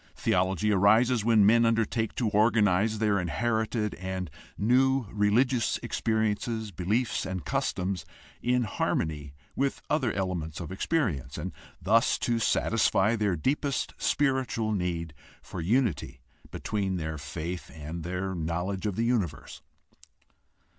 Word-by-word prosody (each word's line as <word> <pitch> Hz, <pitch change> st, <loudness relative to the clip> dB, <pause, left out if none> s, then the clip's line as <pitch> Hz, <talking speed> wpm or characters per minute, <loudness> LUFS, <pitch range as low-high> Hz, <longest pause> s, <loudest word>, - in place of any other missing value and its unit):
Theology 95 Hz, +3 st, +1 dB
arises 110 Hz, +4 st, +4 dB
when 110 Hz, -2 st, +5 dB
men 115 Hz, +3 st, +5 dB
undertake 115 Hz, -1 st, +1 dB
to 120 Hz, -, 0 dB
organize 105 Hz, -1 st, +3 dB
their 105 Hz, -2 st, +2 dB
inherited 110 Hz, -, -1 dB
and 95 Hz, -2 st, -5 dB, 0.3 s
new 130 Hz, +4 st, +3 dB
religious 110 Hz, +3 st, +2 dB
experiences, 110 Hz, 0 st, -1 dB
beliefs, 105 Hz, +7 st, -1 dB
and 90 Hz, -5 st, -4 dB
customs 90 Hz, +5 st, -1 dB, 0.4 s
in 125 Hz, 0 st, +2 dB
harmony 75 Hz, -8 st, -2 dB, 0.2 s
with 140 Hz, 0 st, 0 dB
other 140 Hz, -6 st, +2 dB
elements 90 Hz, -5 st, -3 dB
of 85 Hz, -1 st, -6 dB
experience, 95 Hz, -, -1 dB
and -, -, -4 dB, 0.3 s
thus -, -, +3 dB
to 120 Hz, -1 st, 0 dB
satisfy 115 Hz, -1 st, +2 dB
their 105 Hz, -4 st, +1 dB
deepest 140 Hz, -, -1 dB
spiritual 130 Hz, -6 st, +1 dB
need 85 Hz, -5 st, -2 dB, 0.3 s
for -, -, -6 dB
unity 110 Hz, -, 0 dB, 0.3 s
between 100 Hz, -3 st, -2 dB
their 80 Hz, -2 st, -4 dB
faith 80 Hz, +5 st, -5 dB
and 80 Hz, +2 st, -7 dB
their 90 Hz, +2 st, -3 dB
knowledge 90 Hz, +4 st, -2 dB
of 100 Hz, -, -2 dB
the 115 Hz, -, 0 dB
universe. 100 Hz, -, -2 dB
105 Hz, 120 wpm, -28 LUFS, 90-115 Hz, 0.4 s, when